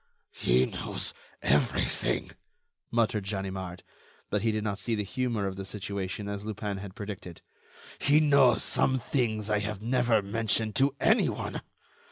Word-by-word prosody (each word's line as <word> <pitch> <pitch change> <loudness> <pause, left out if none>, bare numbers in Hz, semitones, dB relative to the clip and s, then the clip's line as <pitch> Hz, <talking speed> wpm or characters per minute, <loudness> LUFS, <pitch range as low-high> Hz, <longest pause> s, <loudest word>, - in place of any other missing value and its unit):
"He 65 +2 +3
knows - - -3 0.3
everything," 75 +2 +1 0.6
muttered 115 -3 +1
Ganimard, 95 -3 -4 0.5
but 105 - +1
he 110 +1 +2
did 110 -1 -1
not 100 -2 -2
see 115 - 0
the 105 - -1
humor 120 -1 -1
of 95 -1 -3
the 100 - -4
situation 100 0 -4
as 100 0 -4
Lupin 105 -2 -3
had 95 -1 -8
predicted. 100 -4 -7 0.6
"He 145 +2 +5
knows 140 -6 +5
some 130 - +2
things 110 -4 -1
I 105 - +3
have 105 0 -3
never 120 -3 +3
mentioned 110 +1 0
to 135 +1 +3
any - - +4
one. - - -4
105 Hz, 150 wpm, -29 LUFS, 100-115 Hz, 0.6 s, He